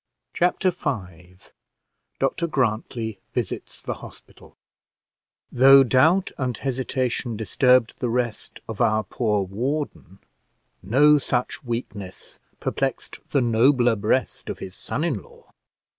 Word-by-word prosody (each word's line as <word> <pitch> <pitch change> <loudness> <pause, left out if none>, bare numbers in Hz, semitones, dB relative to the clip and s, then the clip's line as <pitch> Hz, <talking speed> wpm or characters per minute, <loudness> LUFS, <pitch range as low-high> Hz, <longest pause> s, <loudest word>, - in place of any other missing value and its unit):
Chapter 180 +1 +2
V 95 - -5 0.8
DR 135 +5 0
GRANTLY 115 -5 -2
VISITS - - -4
THE - - -3
HOSPITAL - - -15 0.9
Though 135 +2 +8
doubt 160 - +3
and 125 -4 -1
hesitation 130 -3 -2
disturbed 125 +3 +2
the 125 - -1
rest 120 -2 -3
of 110 -3 -5
our 110 0 +3
poor 105 -1 0
warden, 120 +1 -4 0.6
no 145 +10 +5
such 125 -1 -2
weakness 110 -6 -6 0.2
perplexed - - -3
the 140 - +2
nobler 120 +1 +3
breast 110 +5 -1
of - - -4
his 95 - -8
son 145 - -4
in 140 - -1
law. - - -20
125 Hz, 115 wpm, -24 LUFS, 110-135 Hz, 0.9 s, Though